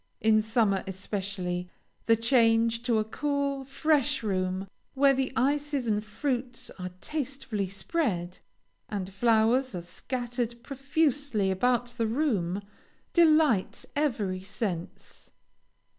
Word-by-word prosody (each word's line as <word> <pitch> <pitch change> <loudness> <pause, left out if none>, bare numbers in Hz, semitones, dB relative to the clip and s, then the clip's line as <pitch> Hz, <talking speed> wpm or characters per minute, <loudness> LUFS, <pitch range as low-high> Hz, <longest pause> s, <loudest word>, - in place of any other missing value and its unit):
In 220 0 +4
summer 215 -3 +1
especially, 190 -2 -3 0.4
the 230 - +6
change 230 -1 +3
to 235 -3 +2
a 215 - +2
cool, 280 +3 -1
fresh 285 -1 +1
room, 185 -1 -1 0.3
where 275 0 +5
the 265 0 -1
ices 285 0 +1
and 210 -2 0
fruits 245 +2 -3
are 180 0 -4
tastefully 265 -8 -3
spread, 195 - -2 0.5
and 195 -2 -4
flowers 230 +3 +3
are 175 - -4
scattered 240 +5 -4
profusely 275 -6 0
about 245 +5 +2
the 230 -2 -1
room, 210 - 0 0.5
delights 310 - +4
every 220 -11 0
sense. 190 -3 -5
230 Hz, 110 wpm, -28 LUFS, 195-275 Hz, 0.5 s, the